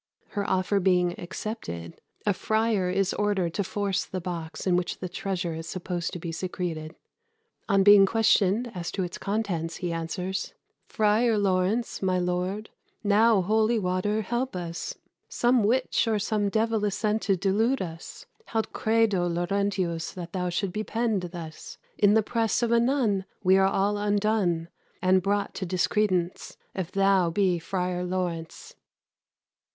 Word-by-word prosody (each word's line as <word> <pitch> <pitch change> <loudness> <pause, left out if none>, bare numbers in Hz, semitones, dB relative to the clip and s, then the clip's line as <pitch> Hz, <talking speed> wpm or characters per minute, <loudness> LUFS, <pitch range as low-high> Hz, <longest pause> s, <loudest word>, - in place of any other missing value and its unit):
Her 205 -1 -3
offer 190 +2 +1
being 180 -2 +2
accepted, 170 - -6 0.2
a 205 - +3
friar 215 -1 +1
is 195 +1 +1
ordered 195 -5 0
to 200 - 0
force 195 0 -1
the 185 - -5
box 170 -2 -5
in 185 -2 +3
which 180 0 -1
the 185 - -5
treasure 180 -1 -3
is 160 0 -6
supposed 175 -2 -3
to - - -3
be 170 -1 -5
secreted. 165 -2 -4 0.7
On 195 -1 +4
being 205 -1 +8
questioned 225 +1 +2
as 175 -3 -4
to 190 - -1
its 175 -1 -6
contents, 190 -6 -2
he 175 -2 -3
answers 180 +3 -3 0.3
"Frier 220 +1 +2
Laurence, 195 +4 0
my 185 -1 +1
lord, 180 +4 -2 0.3
now 210 0 +4
holy 220 +4 +2
water 205 +2 0
help 240 +2 -2
us! 170 -1 -4 0.3
Some 240 -1 +2
witch 250 +2 +2
or 220 -1 +2
some 205 0 0
divell 220 0 +1
is 205 - 0
sent 215 0 0
to 195 -2 +1
delude 215 +8 +1
us: 165 -2 -7 0.2
Haud 225 -1 -2
credo 220 -5 +2
Laurentius 175 -1 -1
that 175 -2 -8
thou 180 -2 -1
shouldst 180 +1 -2
be 215 - -2
pen'd 220 -6 -1
thus 165 -3 -8 0.2
In 205 0 +5
the 220 - +4
presse 225 +1 0
of 235 - +1
a 235 - +5
nun; 230 -6 +1 0.2
we 185 0 +5
are 190 0 +5
all 200 +2 +1
undone, 205 -5 +1 0.3
And 185 0 +3
brought 200 +2 0
to 190 - -4
discredence, 185 0 0 0.2
if 185 -2 -4
thou 195 -3 +3
be 180 0 +1
Frier 180 +1 -2
Laurence." 175 -3 -4
195 Hz, 155 wpm, -27 LUFS, 180-215 Hz, 0.7 s, being